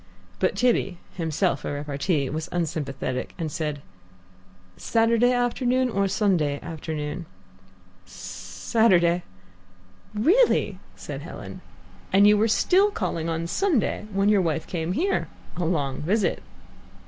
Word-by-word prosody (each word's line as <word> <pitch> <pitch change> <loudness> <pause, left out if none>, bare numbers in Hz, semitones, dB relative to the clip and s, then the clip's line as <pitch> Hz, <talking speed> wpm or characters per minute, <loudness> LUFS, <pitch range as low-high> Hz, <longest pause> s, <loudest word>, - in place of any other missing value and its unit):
But - - +1
Tibby, 235 -7 +1 0.2
himself 165 -2 -1
a - - -3
repartee, 145 +1 -1
was 155 +1 -4
unsympathetic, 145 -6 -3
and 160 -4 -3
said, 150 -2 -3 0.9
"Saturday 230 +1 +2
afternoon 250 +1 +1
or 200 -1 +1
Sunday 175 -8 +1
afternoon?" 160 0 -5 0.8
"S - - -18
Saturday." 170 - +1 0.9
"Really!" 370 - +3 0.2
said - - -7
Helen; - - -9 0.5
"and 195 +1 +6
you 210 0 +7
were 215 +2 +3
still 380 - +4
calling 170 - -2
on 165 0 -2
Sunday, 265 - 0
when 195 0 +1
your 205 -2 +4
wife 160 -2 -1
came 170 0 -3
here. 380 - 0 0.3
A 175 - -2
long 145 -6 -1
visit." 190 +3 0
175 Hz, 120 wpm, -25 LUFS, 155-220 Hz, 0.9 s, you